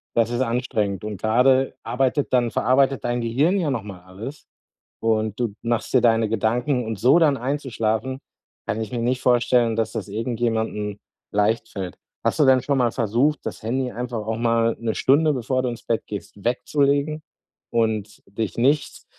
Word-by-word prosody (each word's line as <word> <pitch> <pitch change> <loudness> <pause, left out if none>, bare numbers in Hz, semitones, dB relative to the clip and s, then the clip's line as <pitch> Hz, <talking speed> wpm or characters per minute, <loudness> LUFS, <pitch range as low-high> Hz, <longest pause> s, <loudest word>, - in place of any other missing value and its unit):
Das 115 -1 +3
ist 120 - -1
anstrengend 115 -6 -1
und 105 -3 -5
grade 130 +4 +3
arbeitet 135 +3 0
dann 125 -2 +3
verarbeitet 130 +2 +2
dein 120 0 -1
Gehirn 140 +12 +1
ja 165 -5 0
noch 115 -6 -2
mal 100 -3 -9
alles, 110 +11 -9 0.5
und 110 -2 0
du 120 -4 -1
machst 115 0 -2
dir 130 - +6
deine 115 -2 +3
Gedanken 120 +5 0
und 110 -2 -4
so 130 - +5
dann 150 -4 +4
einzuschlafen, 130 -2 -2 0.5
kann 110 - -2
ich 110 - -4
mir 125 - -3
nicht 125 +2 0
vorstellen, 120 -2 +3
dass 115 -1 -1
das - - -5
irgendjemandem 110 -2 -2 0.3
leicht 110 +3 +1
fällt. 95 -2 -6 0.3
Hast - - +1
du 150 - +5
denn 130 -1 +5
schon 140 +2 0
mal 125 -3 +2
versucht, 125 +6 +1
das - - -5
Handy 125 +3 -1
einfach 120 0 -4
auch 110 - -1
mal 115 0 +2
'ne 115 -1 -2
Stunde, 150 +3 +3
bevor 130 0 -1
du 125 - -1
ins 120 -1 -8
Bett 115 - 0
gehst, 100 -1 -7
wegzulegen 140 +4 +1 0.5
und 110 -3 -1
dich 105 +2 -4
nicht, 140 +4 +1
120 Hz, 175 wpm, -23 LUFS, 110-130 Hz, 0.5 s, dir